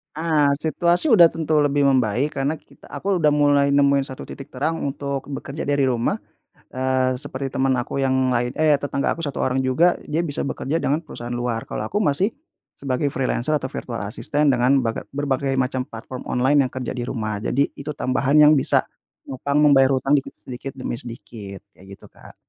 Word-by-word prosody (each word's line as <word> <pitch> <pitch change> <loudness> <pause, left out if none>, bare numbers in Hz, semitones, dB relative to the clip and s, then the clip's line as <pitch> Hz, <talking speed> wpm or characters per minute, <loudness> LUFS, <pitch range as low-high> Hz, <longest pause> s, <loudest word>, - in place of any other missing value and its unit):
Ah, 155 -3 +2
situasi 175 - +2
udah 175 -7 +8
tentu 160 -2 0
lebih 145 -1 +2
membaik 130 +3 0
karena 140 +4 0
kit 150 -1 -20
aku 195 -2 -2
udah 150 -2 +4
mulai 145 -1 +4
nemuin 140 -1 +3
satu 130 - -8
titik 135 - -9
terang 155 +5 -2
untuk 140 -1 -4
bekerja 140 +1 -6
dari 145 -1 +2
rumah, 120 -3 +1 0.5
eee, 130 0 0
seperti 135 +1 -5
teman 135 0 +1
aku 125 +1 -2
yang 135 -1 +1 0.2
lain 125 0 0
eh 155 -1 +3
tetangga 140 0 -2
aku 165 - -4
1 140 -3 -3
orang 130 0 0
juga, 130 +7 +3
dia 155 +2 -1
bisa 150 -5 -3
bekerja 140 +2 -2
dengan 155 -1 0
perusahaan 120 -6 -7
luar. 120 0 -2
Kalau - - -5
aku 205 - -2
masih 190 0 +2 0.5
sebagai 135 +1 -1
freelancer 135 +1 0
atau 130 -2 -7
virtual 115 -4 -5
assistant 145 +7 +1
dengan 125 +2 +3
baga 115 - -2
berbagai 135 -1 -1
macam 130 0 0
platform 120 +3 -8
online 135 +4 +3
yang - - -35
kerja 125 - -3
di 125 - -4
rumah. 110 -4 -3
Jadi 140 +5 +1
itu 140 - -8
tambahan 135 +3 +1
yang 150 0 +8
bisa 135 -3 +2 0.4
nupang 140 +2 -2
membayar 135 -2 +6
hutang 135 +2 0
dikit 140 -2 0
sedikit 130 +2 -7
demi 130 - -4
sedikit, 115 -4 -9
kayak 95 - -18
gitu - - -17
Kak. - - -16
135 Hz, 185 wpm, -22 LUFS, 130-150 Hz, 0.5 s, udah